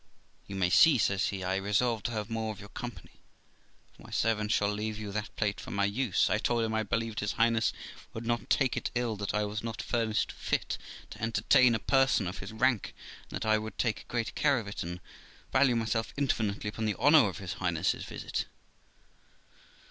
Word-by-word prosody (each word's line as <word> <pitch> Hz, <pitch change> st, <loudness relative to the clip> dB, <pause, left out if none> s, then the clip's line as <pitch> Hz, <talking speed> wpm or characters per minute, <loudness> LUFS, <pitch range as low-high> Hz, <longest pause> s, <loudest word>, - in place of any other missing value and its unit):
'You 100 Hz, -, -6 dB
may 90 Hz, -2 st, +1 dB
see', 155 Hz, -, +7 dB
says 100 Hz, -3 st, +2 dB
he, 95 Hz, -1 st, -4 dB
'I 95 Hz, +1 st, 0 dB
resolve 105 Hz, +4 st, +1 dB
to 120 Hz, -, -3 dB
have 105 Hz, -3 st, -3 dB
more 110 Hz, -1 st, -2 dB
of 105 Hz, -, -9 dB
your 100 Hz, -, -10 dB
company, 120 Hz, -7 st, -8 dB, 0.7 s
for -, -, -19 dB
my -, -, -13 dB
servant 105 Hz, -2 st, 0 dB
shall 105 Hz, -, +3 dB
leave 105 Hz, +1 st, -3 dB
you 105 Hz, -2 st, -5 dB
that 105 Hz, +2 st, -4 dB
plate 105 Hz, -2 st, -1 dB
for -, -, -8 dB
my 100 Hz, 0 st, +1 dB
use.' 105 Hz, 0 st, +1 dB
I -, -, +1 dB
told 120 Hz, -1 st, +1 dB
him 110 Hz, 0 st, -1 dB
I 110 Hz, -, +1 dB
believed 115 Hz, +1 st, -2 dB
his 105 Hz, -, -1 dB
Highness 115 Hz, 0 st, +2 dB, 0.4 s
would 115 Hz, +1 st, -7 dB
not 120 Hz, 0 st, -1 dB
take 130 Hz, -3 st, +2 dB
it -, -, -2 dB
ill 120 Hz, -2 st, 0 dB
that 100 Hz, +1 st, -3 dB
I 105 Hz, 0 st, +1 dB
was 105 Hz, +2 st, -4 dB
not 115 Hz, -1 st, -5 dB
furnished 115 Hz, -3 st, 0 dB
fit -, -, -2 dB, 0.3 s
to -, -, -10 dB
entertain 115 Hz, +2 st, +4 dB
a -, -, -1 dB
person 135 Hz, -4 st, +3 dB
of 90 Hz, +2 st, -5 dB
his 95 Hz, -, -7 dB
rank, 120 Hz, -1 st, +1 dB, 0.3 s
and -, -, -6 dB
that -, -, -4 dB
I 110 Hz, 0 st, +3 dB
would 110 Hz, +1 st, -7 dB
take 110 Hz, -3 st, -1 dB
great 115 Hz, -2 st, -2 dB
care 140 Hz, -2 st, +3 dB
of 110 Hz, -4 st, -4 dB
it, 100 Hz, -, -5 dB
and 90 Hz, +1 st, -5 dB, 0.5 s
value 130 Hz, -2 st, +4 dB
myself 115 Hz, 0 st, -1 dB
infinitely 110 Hz, -7 st, 0 dB
upon 110 Hz, +1 st, -4 dB
the 105 Hz, -, 0 dB
honour 145 Hz, -3 st, +6 dB
of 95 Hz, -, -7 dB
his 95 Hz, -4 st, -5 dB
Highness's 85 Hz, -4 st, 0 dB
visit. -, -, -4 dB
110 Hz, 210 wpm, -30 LUFS, 100-115 Hz, 0.7 s, see